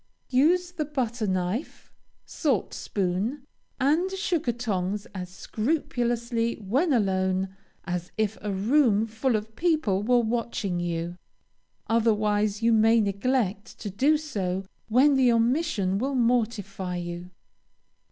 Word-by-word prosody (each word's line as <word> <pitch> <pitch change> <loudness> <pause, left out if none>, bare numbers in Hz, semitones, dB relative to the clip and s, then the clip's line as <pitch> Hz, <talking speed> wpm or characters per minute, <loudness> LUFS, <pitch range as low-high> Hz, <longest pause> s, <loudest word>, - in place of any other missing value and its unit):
Use 345 +7 +3
the 345 -4 -2
butter 245 -6 -2
knife, 185 - -3 0.3
salt 270 - -1
spoon, 205 +9 -2 0.3
and 310 +8 +2
sugar 365 - -1
tongs 205 -4 -2
as 180 -2 -5
scrupulously 235 - -1
when 255 - 0
alone, 190 -4 +1 0.3
as 180 0 -3
if 215 -1 0
a 210 - -3
room 220 +2 +3
full 225 +3 0
of 215 +1 -4
people 310 - +1
were 245 +4 +3
watching 230 -5 -1
you. 175 0 -3 0.7
Otherwise, 215 -2 +1
you 230 0 +4
may 225 +1 +5
neglect 205 0 -1
to 205 - -6
do 280 +10 +3
so 195 -11 -3 0.2
when 260 +6 +5
the 260 -3 +4
omission 230 - +1
will 270 +3 -1
mortify 215 -6 0
you. 175 0 -5
225 Hz, 120 wpm, -26 LUFS, 195-260 Hz, 0.7 s, may